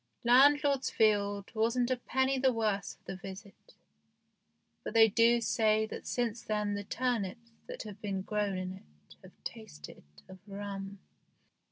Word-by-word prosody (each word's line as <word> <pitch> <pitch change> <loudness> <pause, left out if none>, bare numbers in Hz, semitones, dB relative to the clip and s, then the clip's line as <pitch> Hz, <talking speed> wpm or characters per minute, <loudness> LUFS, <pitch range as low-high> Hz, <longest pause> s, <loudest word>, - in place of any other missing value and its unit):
Landlord's 280 +2 +5
field 205 -2 +1
wasn't 235 +3 +1
a - - +3
penny 265 +2 0
the 260 0 +3
worse 215 -4 -1
for - - -36
the 190 - -5
visit, 195 - -11 1.1
but 215 - -6
they 225 0 +8
do 230 +2 +4
say 220 -1 +2
that - - -8
since 235 -2 -1
then 210 -1 -1
the 205 0 -3
turnips 230 0 -3 0.2
that - - -6
have 210 -2 -10
been 195 -2 -3
grown 205 -2 -1
in 185 0 -4
it 75 - -17
have - - -18
tasted 75 0 -9 0.3
of 190 0 -12
rum. 200 0 -6
215 Hz, 150 wpm, -31 LUFS, 195-240 Hz, 1.1 s, they